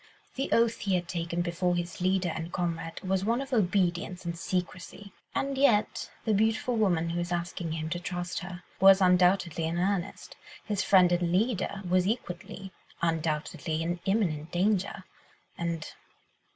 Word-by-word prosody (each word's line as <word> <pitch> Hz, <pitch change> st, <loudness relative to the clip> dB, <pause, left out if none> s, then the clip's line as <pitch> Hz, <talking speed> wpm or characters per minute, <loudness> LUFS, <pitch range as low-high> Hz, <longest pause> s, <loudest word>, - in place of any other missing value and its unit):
The 270 Hz, -, -3 dB
oath 230 Hz, 0 st, +3 dB
he 195 Hz, -2 st, 0 dB
had 175 Hz, -1 st, -1 dB
taken 170 Hz, 0 st, -2 dB
before 175 Hz, +1 st, 0 dB
his 175 Hz, +1 st, -4 dB
leader 185 Hz, 0 st, +2 dB
and 165 Hz, +1 st, -5 dB
comrade 165 Hz, -2 st, -3 dB
was 190 Hz, 0 st, 0 dB
one 230 Hz, +4 st, +1 dB
of 275 Hz, 0 st, -5 dB
obedience 185 Hz, -3 st, +1 dB
and 170 Hz, 0 st, -3 dB
secrecy; 185 Hz, +3 st, -4 dB, 0.2 s
and 275 Hz, 0 st, -1 dB
yet 235 Hz, -7 st, +2 dB, 0.2 s
the 220 Hz, -, +2 dB
beautiful 225 Hz, +4 st, +1 dB
woman, 175 Hz, -7 st, +2 dB
who 170 Hz, -, -2 dB
was 175 Hz, 0 st, -3 dB
asking 175 Hz, -1 st, -2 dB
him 160 Hz, -1 st, -3 dB
to 175 Hz, -, -1 dB
trust 175 Hz, 0 st, -4 dB
her, 180 Hz, -1 st, -8 dB, 0.2 s
was 195 Hz, 0 st, +8 dB
undoubtedly 180 Hz, -3 st, +3 dB
in 165 Hz, +1 st, -2 dB
earnest; 185 Hz, +1 st, -2 dB, 0.3 s
his 205 Hz, -2 st, -1 dB
friend 185 Hz, -3 st, +5 dB
and 175 Hz, -1 st, +1 dB
leader 200 Hz, 0 st, 0 dB
was 180 Hz, +1 st, +2 dB
equally 195 Hz, -2 st, -4 dB, 0.3 s
undoubtedly 160 Hz, 0 st, -1 dB
in 175 Hz, +1 st, -2 dB
imminent 170 Hz, -7 st, 0 dB
danger 195 Hz, +1 st, 0 dB, 0.5 s
and 170 Hz, -1 st, -4 dB
180 Hz, 155 wpm, -29 LUFS, 170-200 Hz, 0.5 s, was